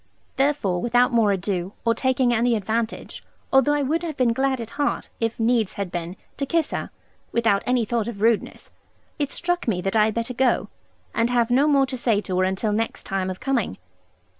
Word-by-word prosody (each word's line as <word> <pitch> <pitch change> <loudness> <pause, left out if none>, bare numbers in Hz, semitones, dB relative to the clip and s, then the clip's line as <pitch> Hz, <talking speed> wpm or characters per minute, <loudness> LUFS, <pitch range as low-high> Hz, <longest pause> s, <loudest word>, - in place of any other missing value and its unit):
Therefore, 270 -11 +1
without 245 +2 +3
more 225 -3 +4
ado, 190 -1 -2
or 230 - +4
taking 255 0 +1
any 235 +1 +2
advantage 220 +2 -3 0.3
although 270 +2 +5
I 290 - +1
would 315 +5 0
have 320 -4 -5
been 245 -3 +3
glad 265 +1 0
at 230 -1 -6
heart, 290 0 -2
if 230 0 -2
needs 225 -3 +2
had 200 -3 -4
been, 175 +1 -4 0.2
to 275 - -1
kiss 330 -1 +1
her - - -3 0.4
(without 225 -4 +2
any 250 -2 +2
thought 230 -1 -1
of 230 -4 -6
rudeness) 225 0 0 0.5
it 290 -2 0
struck 350 +1 -2
me 200 -6 +1
that 195 +3 -2
I 215 -1 +5
had 215 - -1
better 230 +2 -2
go, 255 +1 +1 0.4
and 230 +1 +1
have 240 -1 +1
no 270 +4 +4
more 280 -2 +4
to 260 -1 -5
say 230 -4 +2
to 185 -3 -2
her 185 - +3
until 190 +3 -1
next 225 +2 -2
time 190 -1 -2
of 185 - -5
coming. 255 - -1
235 Hz, 205 wpm, -23 LUFS, 205-265 Hz, 0.5 s, although